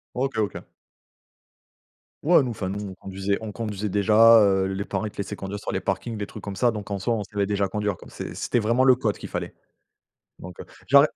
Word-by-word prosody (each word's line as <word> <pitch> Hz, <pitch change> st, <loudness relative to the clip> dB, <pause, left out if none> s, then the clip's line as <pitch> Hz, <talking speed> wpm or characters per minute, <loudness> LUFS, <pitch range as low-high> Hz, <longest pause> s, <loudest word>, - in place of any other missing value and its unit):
OK. 130 Hz, 0 st, -1 dB
OK. 105 Hz, -, -2 dB, 1.6 s
Ouais, 170 Hz, +1 st, +6 dB
nous, 130 Hz, -3 st, -2 dB
enfin, 100 Hz, -4 st, -4 dB
nous 100 Hz, 0 st, -4 dB
on -, -, -8 dB
conduisait. 95 Hz, +1 st, -2 dB
On 110 Hz, -1 st, -5 dB
conduisait 105 Hz, -2 st, -4 dB
déjà, 110 Hz, +3 st, +6 dB
heu, 95 Hz, -2 st, +3 dB
les 95 Hz, +1 st, -3 dB
parents, -, -, -3 dB
ils 105 Hz, -, -4 dB
te -, -, -24 dB
laissaient 100 Hz, +1 st, -4 dB
conduire 100 Hz, +1 st, -6 dB
sur -, -, -5 dB
les -, -, -1 dB
parkings, 100 Hz, +4 st, -2 dB
des 105 Hz, -, -3 dB
trucs 105 Hz, -, -10 dB
comme 100 Hz, 0 st, -6 dB
ça. 120 Hz, +5 st, +3 dB
Donc, 105 Hz, -2 st, -7 dB
en 100 Hz, -, -2 dB
soi, 115 Hz, +5 st, 0 dB
on 105 Hz, -, -2 dB
savait 100 Hz, 0 st, -1 dB
déjà 100 Hz, -1 st, 0 dB
conduire, 105 Hz, -1 st, -2 dB
quoi. -, -, -14 dB
C'est -, -, -7 dB
c'était 120 Hz, -, 0 dB
vraiment 115 Hz, +4 st, +2 dB
le 130 Hz, -1 st, +7 dB
code 110 Hz, -5 st, -1 dB
qu'il -, -, -8 dB
fallait. -, -, -5 dB, 0.9 s
Donc, 90 Hz, -2 st, -10 dB
heu, -, -, -7 dB, 0.2 s
genre, 140 Hz, +2 st, +7 dB
105 Hz, 230 wpm, -25 LUFS, 100-115 Hz, 1.6 s, le